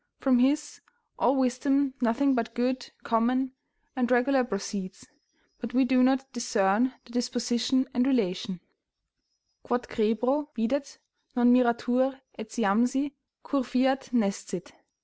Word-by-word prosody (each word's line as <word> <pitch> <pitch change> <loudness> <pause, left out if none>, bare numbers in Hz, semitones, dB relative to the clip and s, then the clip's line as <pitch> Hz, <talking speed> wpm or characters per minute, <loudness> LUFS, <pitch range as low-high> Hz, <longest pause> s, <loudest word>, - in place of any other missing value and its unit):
From 260 -3 +3
His 285 +4 +1 0.4
all 255 +3 +3
wisdom 270 +1 +1
nothing 260 +4 +2
but 230 -1 -2
good, 250 +1 -1
common; 250 +3 +1 0.4
and 250 -2 0
regular 255 +2 +3
proceeds; 195 -3 -5 0.5
but 240 0 -6
we 260 +1 +4
do 255 0 +3
not 265 +1 +3
discern 235 0 +1
the 240 - -16
disposition 245 +1 0
and 245 +1 +2
relation: 190 -7 -1 1.0
"Quod 245 -1 -2
crebro 245 +7 0
videt, 275 +5 -2 0.4
non 245 0 +5
miratur, 250 +2 +2 0.2
etiamsi, 235 +5 0 0.3
cur 280 -1 0
fiat, 260 +1 0
nescit. 195 -5 -2
245 Hz, 115 wpm, -27 LUFS, 230-265 Hz, 1.0 s, non